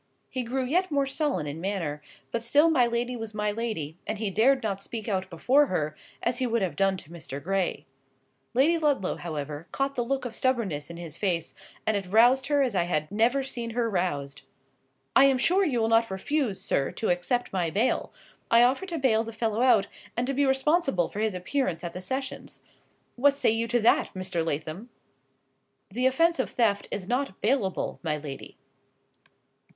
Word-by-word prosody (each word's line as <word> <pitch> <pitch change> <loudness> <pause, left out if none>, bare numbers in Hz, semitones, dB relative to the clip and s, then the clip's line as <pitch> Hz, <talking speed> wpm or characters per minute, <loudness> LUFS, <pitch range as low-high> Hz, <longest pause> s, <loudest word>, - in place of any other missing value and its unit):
He 260 - -2
grew 255 +2 -2
yet 360 +8 +1
more 280 -2 +1
sullen 275 - -1
in 150 +3 -5
manner; 170 -7 -2 0.3
but 235 - -1
still 290 +8 +4
my 250 -6 +4
lady 240 +1 -1
was 225 -2 -6
my 210 0 0
lady, 205 -8 -4
and 215 - -2
he 210 -2 -2
dared 255 +6 +3
not 200 -3 -2
speak 220 +2 -6
out 190 -3 -1
before 260 - +3
her, 155 - -1 0.3
as 245 - 0
he 255 - +1
would 230 -3 +1
have 185 - -2
done 195 -1 +2
to 165 - -12
Mr. 155 -5 -7
Gray. 190 +3 -1 0.7
Lady 315 +7 +4
Ludlow, 285 - +1
however, 150 -1 -5
caught 275 0 -1
the 245 - -1
look 270 +2 -2
of 240 - -4
stubborness 215 - -1
in 170 - -8
his 170 -2 -8
face, 175 -5 -1 0.3
and 220 - +2
it 195 -2 -2
roused 240 +7 +5
her 290 -1 +3
as 250 -4 0
I 175 -2 +2
had 155 -1 -1
never 235 +6 +2
seen 240 -3 -4
her 235 -1 +2
roused. 145 -7 -2 0.7
"I 270 - +8
am 270 -1 +4
sure 360 +9 +3
you 270 -10 +1
will 225 - +2
not 230 0 +3
refuse, 215 +1 -1
sir, 140 -7 0
to 220 - 0
accept 180 +8 -1
my 175 -3 0
bail. 220 +9 0 0.4
I 235 +1 +6
offer 265 +10 +2
to 340 -3 -3
bail 235 -6 +2
the 230 - -7
fellow 225 0 -1
out, 235 -6 +5 0.3
and 240 - +1
to 275 - -1
be 280 +1 +2
responsible 270 - +2
for 205 - -6
his 215 -3 0
appearance 180 -1 -2
at 170 -1 -5
the 180 - -6
sessions. 260 +8 -5 0.5
What 280 +3 +4
say 280 - +2
you 225 +1 0
to 240 +1 +2
that, 225 - +3
Mr. 185 -3 -2
Lathom?" 160 +8 -4 1.0
"The 250 +5 +2
offence 330 +4 +2
of 260 - 0
theft 210 -4 +1
is 190 -2 -4
not 250 -4 -1
bailable, 215 -5 0
my 155 -3 -1
lady." 145 -2 -8
225 Hz, 195 wpm, -27 LUFS, 180-260 Hz, 1.0 s, I